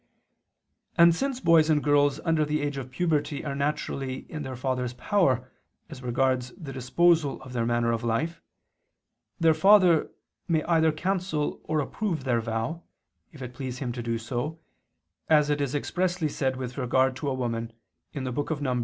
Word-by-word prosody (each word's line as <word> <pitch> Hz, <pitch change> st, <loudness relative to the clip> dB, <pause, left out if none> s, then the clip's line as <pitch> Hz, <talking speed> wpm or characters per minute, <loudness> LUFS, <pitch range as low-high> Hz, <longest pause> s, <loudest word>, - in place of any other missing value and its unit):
And 170 Hz, 0 st, +7 dB
since 270 Hz, +8 st, -2 dB
boys 165 Hz, -6 st, +4 dB
and 150 Hz, -2 st, +3 dB
girls 145 Hz, -1 st, +3 dB
under 160 Hz, -2 st, +2 dB
the 150 Hz, 0 st, -1 dB
age 145 Hz, -1 st, -2 dB
of 130 Hz, -2 st, -5 dB
puberty 150 Hz, -1 st, -1 dB
are 140 Hz, -, -2 dB
naturally 140 Hz, -2 st, -3 dB
in 155 Hz, -, -5 dB
their 130 Hz, -2 st, -5 dB
father's 125 Hz, -1 st, -2 dB
power 130 Hz, -, +1 dB, 0.4 s
as 135 Hz, -4 st, -9 dB
regards 125 Hz, 0 st, 0 dB
the 150 Hz, -7 st, -8 dB
disposal 145 Hz, +4 st, +2 dB
of 130 Hz, -1 st, -10 dB
their 115 Hz, -2 st, 0 dB
manner 120 Hz, 0 st, +1 dB
of 115 Hz, 0 st, -2 dB
life, 120 Hz, +9 st, -1 dB, 1.0 s
their 165 Hz, -2 st, +5 dB
father 185 Hz, -3 st, +5 dB, 0.4 s
may 160 Hz, -3 st, +1 dB
either 160 Hz, -1 st, +3 dB
cancel 175 Hz, -2 st, -2 dB
or 155 Hz, 0 st, 0 dB
approve 170 Hz, 0 st, -3 dB
their 120 Hz, -3 st, +1 dB
vow, 115 Hz, +9 st, -3 dB, 0.5 s
if 145 Hz, -6 st, -10 dB
it 125 Hz, 0 st, -7 dB
please 130 Hz, -1 st, -5 dB
him 125 Hz, -2 st, -3 dB
to 120 Hz, 0 st, -5 dB
do 115 Hz, 0 st, -2 dB
so, 125 Hz, +8 st, -4 dB, 0.7 s
as 150 Hz, -2 st, +4 dB
it 145 Hz, 0 st, 0 dB
is 140 Hz, 0 st, -1 dB
expressly 175 Hz, +2 st, -1 dB
said 130 Hz, -2 st, -1 dB
with 130 Hz, 0 st, -5 dB
regard 130 Hz, +1 st, +2 dB
to 145 Hz, +1 st, -2 dB
a -, -, -1 dB
woman 115 Hz, -2 st, -3 dB, 0.4 s
(Num. 135 Hz, 0 st, -2 dB
140 Hz, 165 wpm, -27 LUFS, 125-160 Hz, 1.0 s, And